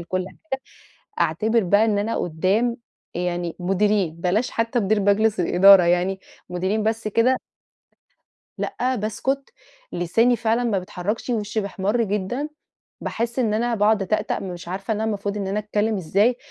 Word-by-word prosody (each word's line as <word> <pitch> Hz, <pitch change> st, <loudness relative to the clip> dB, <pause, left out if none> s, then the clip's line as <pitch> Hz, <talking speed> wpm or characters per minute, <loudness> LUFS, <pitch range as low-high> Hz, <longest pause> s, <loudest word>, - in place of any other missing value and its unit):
لكل 185 Hz, +2 st, -2 dB
حاجة، 265 Hz, +1 st, -6 dB, 0.6 s
أعتبر 210 Hz, +8 st, +2 dB
بقى 205 Hz, +4 st, +4 dB
إن 215 Hz, -2 st, +1 dB
أنا 215 Hz, +3 st, -1 dB
قدام 195 Hz, +9 st, 0 dB, 0.4 s
يعني 175 Hz, -1 st, -2 dB
مديرين، 195 Hz, -1 st, +1 dB
بلاش 185 Hz, +8 st, 0 dB
حتى 230 Hz, +1 st, 0 dB
مدير 210 Hz, +1 st, +1 dB
مجلس 205 Hz, +1 st, +2 dB
الإدارة، 190 Hz, +2 st, +7 dB
يعني 180 Hz, +2 st, +1 dB, 0.3 s
مديرين 185 Hz, +5 st, -1 dB
بس 220 Hz, 0 st, -1 dB
كده. 230 Hz, +5 st, +3 dB, 1.2 s
لأ، 255 Hz, +1 st, -1 dB
باسكت، 265 Hz, +6 st, -2 dB, 0.4 s
لساني 225 Hz, +8 st, +2 dB
فعلًا 230 Hz, +1 st, 0 dB
ما 220 Hz, -5 st, +1 dB
بيتحركش، 195 Hz, +5 st, -4 dB
وشي 215 Hz, -2 st, -1 dB
بيحمّر 200 Hz, +3 st, -1 dB
جدًا، 210 Hz, +7 st, -2 dB, 0.5 s
باحس 235 Hz, +2 st, -3 dB
إن 225 Hz, -4 st, +1 dB
أنا 235 Hz, +2 st, 0 dB
باقعد 210 Hz, -1 st, +3 dB
أتأتأ، 215 Hz, +3 st, -1 dB
مش 175 Hz, -3 st, -7 dB
عارفة 195 Hz, +4 st, -3 dB
إن 210 Hz, -, -3 dB
المفروض 205 Hz, -2 st, -2 dB
إن 200 Hz, -2 st, -3 dB
أنا 195 Hz, +2 st, -1 dB
أتكلم 210 Hz, +1 st, 0 dB
إزاي، 200 Hz, +7 st, +2 dB
210 Hz, 145 wpm, -23 LUFS, 185-225 Hz, 1.2 s, الإدارة